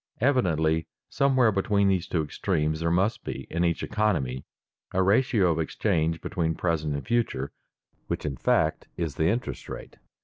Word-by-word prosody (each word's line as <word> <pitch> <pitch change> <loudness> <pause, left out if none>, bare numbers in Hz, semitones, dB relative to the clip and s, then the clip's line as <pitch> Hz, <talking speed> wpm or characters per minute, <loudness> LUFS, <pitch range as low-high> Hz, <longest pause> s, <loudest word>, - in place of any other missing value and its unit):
Evidently 80 - +2 0.2
somewhere 130 -4 +3
between 100 0 +2
these 95 -2 +1
two 80 -3 0
extremes 75 +1 -1
there 85 0 0
must 95 +6 +1
be, 65 - -5
in 85 +2 0
each 85 -1 0
economy, 85 -13 0 0.5
a 95 - +3
ratio 100 -2 +3
of 80 - -1
exchange 80 -1 0
between 80 -3 -1
present 80 -4 -1
and 70 - -5
future, 115 - 0 0.6
which - - -3
in 70 -3 -2
fact - - +1
is 80 -4 -2
the 80 +4 +1
interest 115 +7 -2
rate. - - -8
85 Hz, 160 wpm, -27 LUFS, 80-105 Hz, 0.6 s, somewhere